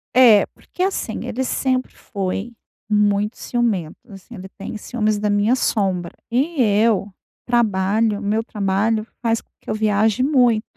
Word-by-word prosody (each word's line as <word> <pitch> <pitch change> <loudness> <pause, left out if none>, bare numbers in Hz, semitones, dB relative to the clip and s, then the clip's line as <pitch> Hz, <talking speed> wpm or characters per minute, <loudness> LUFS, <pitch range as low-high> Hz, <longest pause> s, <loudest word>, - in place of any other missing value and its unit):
É. 235 -5 +7
Porque, 365 - -6
assim, 310 - -2
ele 250 +1 -2
sempre 255 0 -1
foi 200 +2 -4 0.4
muito 210 +1 +1
ciumento. 215 -10 -1
Assim, 195 +4 -12
ele 190 -1 -9
tem 210 +2 -6
ciúmes 215 -2 -1
da 210 0 0
minha 205 +5 +3
sombra. 190 -8 0 0.2
E 280 +4 +1
eu 210 -2 +2 0.4
trabalho 215 -2 +1
o - - -10
meu 215 +2 0
trabalho 215 +2 0
faz 230 -1 +1
com - - -38
que - - -13
eu - - 0
viaje 215 +2 +2
muito. 245 -6 +3
215 Hz, 150 wpm, -20 LUFS, 205-240 Hz, 0.4 s, É